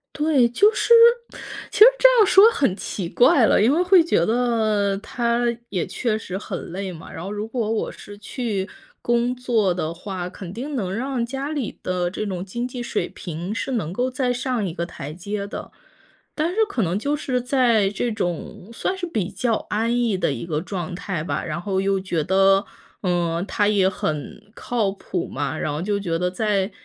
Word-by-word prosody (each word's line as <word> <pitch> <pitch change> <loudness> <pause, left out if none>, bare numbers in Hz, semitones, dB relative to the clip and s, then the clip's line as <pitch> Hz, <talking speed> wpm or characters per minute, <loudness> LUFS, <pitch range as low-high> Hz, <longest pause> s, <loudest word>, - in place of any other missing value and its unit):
对， 295 -5 +3
就 410 - +4
是 470 - +3 0.8
其 - - -4
实 435 - +12
这 - - +8
样 425 - +7
说 400 +4 +7
很 270 - +1
奇 190 -3 -5
怪 240 +4 +5
了， - - +4
因 235 +5 +4
为 345 - +2
会 360 -2 +6
觉 245 - +2
得 220 -4 +1
他 235 +3 -1 0.3
也 185 -4 -1
确 225 -4 -1
实 190 -3 -5
很 185 -4 -6
累 190 +1 -4
嘛， 165 -2 -11
然 165 - -7
后 195 - -5
如 210 +1 -4
果 225 -2 -2
我 225 - -1
是 205 0 -12
去 210 -2 -3 0.3
工 240 +1 +1
作 225 -7 +1
的 165 -2 -3
话， 180 0 -5
肯 180 -1 -9
定 270 +7 -5
能 190 -6 -2
让 255 +1 -2
家 270 +4 -4
里 280 -7 -3
的 180 -1 -1
这 215 - -4
种 185 -3 -3
经 235 +6 -4
济 245 -1 -6
水 - - -2
平 175 +3 -6
是 265 - -3
能 180 -7 -2
够 250 +4 0
再 255 -1 0
上 245 -4 -1
一 170 - -3
个 170 -1 -3
台 150 -3 -8
阶 200 +3 -4
的。 200 - -7 0.6
但 315 +2 0
是 415 - -8
可 230 - 0
能 175 +3 0
就 290 +5 0
是 255 -4 -1
在 240 -6 +3
这 230 +4 -2
种 180 0 -4
算 370 +10 -2
是 355 -2 -4
比 210 - -2
较 240 -2 0 0.2
安 230 +3 +1
逸 230 -5 +1
的 - - 0
一 - - -4
个 155 -2 -2
状 180 -2 -5
态 185 -4 -4
吧， 180 - -2
然 160 0 -3
后 190 +1 -1
又 195 0 +1
觉 175 -5 -2
得， 195 +2 +4 0.4
嗯， 175 -2 0
他 205 -1 +1
也 195 -3 +3
很 155 +4 -5
靠 225 -4 -1
谱 185 -2 -4
嘛， 140 +1 -3
然 150 - -2
后 150 - -3
就 200 +2 -1
觉 170 -4 -2
得 180 0 +1
在 200 +1 0
205 Hz, 215 characters per minute, -22 LUFS, 185-245 Hz, 0.8 s, 实